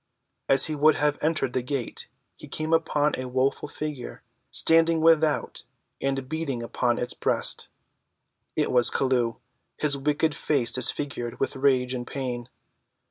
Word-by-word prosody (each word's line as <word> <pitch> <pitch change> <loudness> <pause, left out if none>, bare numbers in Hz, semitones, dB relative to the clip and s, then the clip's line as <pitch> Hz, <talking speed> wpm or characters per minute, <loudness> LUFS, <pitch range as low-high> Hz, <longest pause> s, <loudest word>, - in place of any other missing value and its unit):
As 135 0 +7
he 155 - -3
would 150 +1 +4
have 145 0 0
entered 150 -5 0
the 130 - 0
gate 125 -1 -5 0.3
he - - -12
came 155 +1 -3
upon 150 -2 +2
a 130 - -4
woeful 130 +3 0
figure 150 -4 -6 0.3
standing 165 0 +3
without 160 -1 +2 0.4
and 135 -1 -2
beating 145 -5 -3
upon 120 +1 0
its 125 - -1
breast. - - -2 0.9
It - - 0
was 125 -1 +5
Chelluh, 125 -4 0 0.4
his 150 -2 0
wicked 150 +2 +1
face 140 -6 0
disfigured 130 -2 0
with - - -1
rage 130 -2 +2
and 120 -1 -5
pain. 125 -3 -5
135 Hz, 140 wpm, -25 LUFS, 125-150 Hz, 0.9 s, As